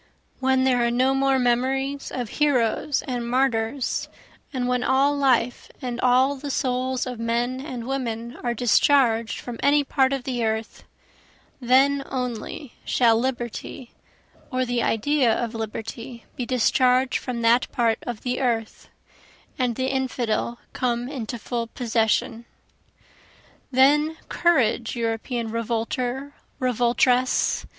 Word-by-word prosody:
When 265 0 +2
there 250 -2 +3
are 235 - +2
no 255 +3 +2
more 270 0 +2
memories 265 +3 0
of 245 -2 -3
heroes 280 0 +1
and 240 -2 -3
martyrs, 250 0 0 0.4
And 250 -3 -2
when 250 0 0
all 275 +2 +3
life 250 -4 +1
and 250 -2 -4
all 255 +3 +4
the 285 +1 -7
souls 255 -1 -1
of 250 -3 -6
men 240 +3 -1
and 255 -6 -6
women 235 -3 -3
are 240 -1 -2
discharged 235 -1 +3
from 240 -2 -7
any 290 +1 +4
part 270 -1 +2
of 270 -2 -2
the 245 -2 -2
earth, 220 0 -3 0.7
Then 270 +3 +3
only 250 +1 -4
shall 235 -3 +3
liberty 240 0 -4 0.6
or 255 0 0
the 245 -1 -1
idea 250 +3 +2
of 235 -1 -3
liberty 225 +2 -6
be 245 - -4
discharged 255 +1 +2
from 245 -2 -4
that 235 +2 +3
part 230 -2 +1
of 240 -3 -6
the 250 0 -2
earth, 230 -4 -2 0.7
And 250 -2 +1
the 260 +2 -1
infidel 240 -3 -1 0.2
come 245 0 -1
into 245 -4 -5
full 235 +1 -3
possession. 230 -1 0 1.2
Then 295 +4 +3
courage 255 -9 +2
European 230 0 -2
revolter, 245 +4 -2 0.3
revoltress! 250 +1 +2
250 Hz, 125 wpm, -24 LUFS, 235-265 Hz, 1.2 s, all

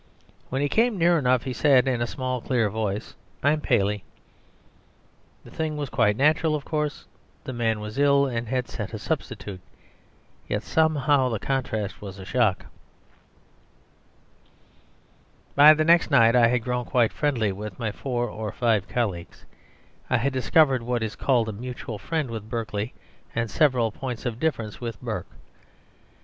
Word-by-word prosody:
When 135 +2 -1
he - - +2
came 225 - +2
near 170 -1 +4
enough 125 -3 +2
he 130 - -4
said, 135 -2 +4
in 125 -3 0
a 120 - 0
small, 130 -1 -3
clear 115 -5 0
voice, 105 -1 -3 0.3
"I'm 150 +2 +2
Paley." 105 -5 +1 1.4
The - - -14
thing 155 -1 -3
was 145 -3 -4
quite 105 -3 +2
natural, 155 +3 +3
of 145 - -5
course; 150 -2 -2 0.4
the 130 - -6
man 115 -2 0
was 105 +4 -6
ill 140 0 +4
and 120 -3 -3
had 125 +1 -1
sent 105 -4 -6
a - - -3
substitute. 95 -3 -4 0.9
Yet 105 +1 -1
somehow 145 -4 +2
the 115 - -1
contrast 110 -5 -3
was 100 -2 -8
a 95 - -9
shock. 110 -3 +1 2.9
By 150 +2 +8
the 155 0 +1
next 170 +1 +5
night 115 +1 +5
I 120 -1 +6
had 120 -1 0
grown 125 0 -2
quite 120 -3 +2
friendly 125 -9 0
with 100 0 -7
my 115 -2 -2
four 120 +1 -2
or 105 -1 -5
five 110 -5 +1
colleagues; 100 -9 -3 0.6
I 125 - +3
had 135 +4 0
discovered 130 +2 +3
what 120 0 -1
is 110 - -4
called 120 -5 +1
a 110 - -4
mutual 120 -1 -6
friend 155 -1 -2
with 110 -2 -6
Berkeley 110 -1 -3 0.4
and 115 -2 -1
several 125 -6 +2
points 125 +1 -6
of 120 -2 -3
difference 120 -10 -2
with 115 -3 -5
Burke. - - -5
125 Hz, 160 wpm, -25 LUFS, 110-140 Hz, 2.9 s, By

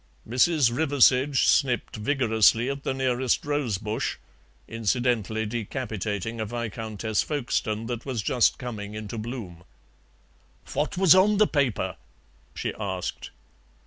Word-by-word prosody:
Mrs. 130 +1 +3
Riversedge 135 -2 +3
snipped 125 -5 +2
vigorously 115 0 +3
at 140 0 -6
the - - -2
nearest 130 -1 0
rose 145 -8 -1
bush, 105 +2 -3 0.5
incidentally 115 -1 0
decapitating 110 -1 -4
a - - -1
Viscountess 110 -2 -3
Folkestone 120 -6 -2
that 120 0 -4
was 125 -6 -3
just 125 +1 +2
coming 105 -5 -6
into 110 +1 -6
bloom. 105 -7 -7 1.1
"What 155 +6 -1
was 185 -4 +7
on 200 +3 +4
the 215 - +5
paper?" 140 - -1 0.6
she - - -3
asked. - - -4
120 Hz, 115 wpm, -26 LUFS, 110-135 Hz, 1.1 s, was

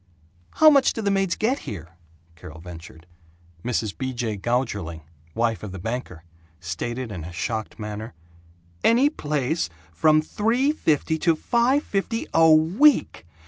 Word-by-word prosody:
"How 310 0 +7
much 280 -2 +4
do 225 - -4
the 200 - +1
maids 195 -2 +1
get 255 +6 0
here?" 90 -5 -7 0.5
Carol 80 -1 -11
ventured. 85 -1 -11 0.6
Mrs. 110 -4 -2
B. 130 -1 -4
J. 120 -3 -2
Gougerling, 100 -7 -2 0.3
wife 115 -1 0
of 105 - -7
the 95 - -7
banker, 105 -4 -5 0.4
stated 115 +8 -4
in 90 -5 -6
a 85 - -8
shocked 110 +5 -4
manner, 105 -2 -6 0.7
"Any 255 +6 +4
place 150 - -1 0.2
from 155 - +4
three 235 - +1
fifty 160 - 0
to 165 0 +3
five 245 - +1
fifty 210 +3 -2
a 165 0 +6
week! 175 - +3
125 Hz, 140 wpm, -24 LUFS, -, 0.7 s, How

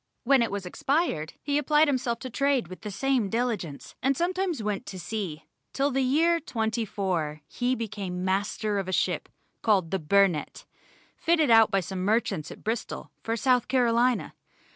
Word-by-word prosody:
When 270 0 +4
it 230 - +1
was 200 -1 -4
expired, 180 - -1
he 285 0 +1
applied 300 +2 +4
himself 255 -4 0
to 260 - -5
trade 275 - +1
with 185 - -9
the 210 - -5
same 240 +1 0
diligence, 220 - -2
and 270 +1 +1
sometimes 355 - -1
went 210 -2 -2
to 190 - -6
sea, 175 -6 -4 0.3
till 275 +1 +1
in - - -5
the 270 - +2
year 325 +6 +3
'24 200 - -2
he 250 +1 -1
became 195 -5 -4
master 205 +2 0
of 195 - -4
a - - -2
ship - - 0 0.3
called 195 -7 +2
the 190 - 0
Burnett, 180 0 +1 0.5
fitted 320 -6 +2
out 225 -1 +7
by 195 -2 +1
some 185 +2 -5
merchants 200 -6 0
at - - -11
Bristol, 225 +2 -4
for 225 0 -2
South 250 0 +2
Carolina. 245 -1 +2
225 Hz, 170 wpm, -27 LUFS, 195-265 Hz, 0.5 s, out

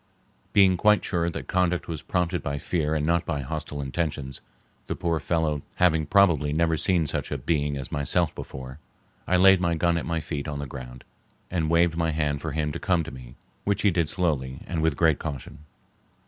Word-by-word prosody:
Being 95 -2 +5
quite 105 +3 +4
sure 85 -2 0
that 80 - -6
conduct 90 -1 +1
was 80 -3 -4
prompted 90 -2 -1
by 70 0 -3
fear 80 +1 -1
and 75 -1 0
not 85 +1 +2
by 75 -4 -2
hostile 75 0 -5
intentions, 70 -2 -3 0.5
the - - -2
poor 85 -2 -1
fellow 80 -2 0
having 80 -4 +3
probably 85 -8 +4
never 80 +1 +2
seen 85 0 +2
such - - -3
a - - -1
being 75 +1 0
as 65 - -6
myself 75 +3 +1
before, 65 0 -8 0.5
I 90 - +3
laid 95 0 +6
my 85 -1 +1
gun 85 +1 +2
at - - -6
my 85 -1 0
feet 75 -2 -4
on 75 -1 -3
the 70 - -4
ground 65 -1 -9 0.5
and 80 -3 0
waved 85 0 +3
my 85 -1 +1
hand 75 -2 -1
for 80 - -3
him 75 -1 -1
to - - -5
come 90 -3 +1
to 80 - -7
me, 60 -1 -11 0.3
which 100 0 0
he 100 - +5
did 85 -3 0
slowly 70 -8 -1
and 85 -3 -2
with 80 -3 +1
great 80 -3 +3
caution. 75 0 -7
80 Hz, 205 wpm, -26 LUFS, 75-85 Hz, 0.5 s, laid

